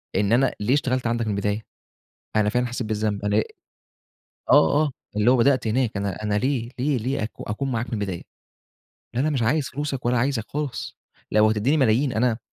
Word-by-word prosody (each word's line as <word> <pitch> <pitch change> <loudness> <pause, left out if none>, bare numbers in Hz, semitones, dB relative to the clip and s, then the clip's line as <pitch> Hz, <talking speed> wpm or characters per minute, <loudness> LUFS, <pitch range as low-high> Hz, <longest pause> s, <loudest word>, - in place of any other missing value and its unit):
إن 100 +2 +1
أنا 135 +3 +3
ليه 110 +6 +1
اشتغلت 130 -4 0
عَندك 115 -1 0
من - - 0
البداية، 105 +2 -1 0.7
أنا 105 -1 +3
فعلًا 125 +2 0
حسّيت 120 -2 -4
بالذنب، 105 -1 -1
أنا 105 +1 +2 1.1
آه، 145 - +5
آه، 145 - -1 0.3
اللي 110 +4 +4
هو 130 - +4
بدأت 130 -1 +3
هناك 115 -2 0
أنا 100 0 -3
أنا 105 -1 0
ليه 120 0 0
ليه 140 0 +1
ليه 125 +1 -2
أكو 110 - -6
أكون 130 +6 -3
معاك 115 0 -2
من 115 - -6
البداية؟ 95 -4 -3 1.0
أنا 145 +5 +2
مش 130 -5 0
عايز 135 +4 +1
فلوسك 135 -2 -4
ولا 125 0 +2
عايزك 120 -3 0
خالص 145 -4 -4 0.4
لو 110 +1 +5
هتدّيني 115 +8 +1
ملايين، 130 0 +2
أنا 115 0 +1
120 Hz, 185 wpm, -24 LUFS, 105-130 Hz, 1.1 s, آه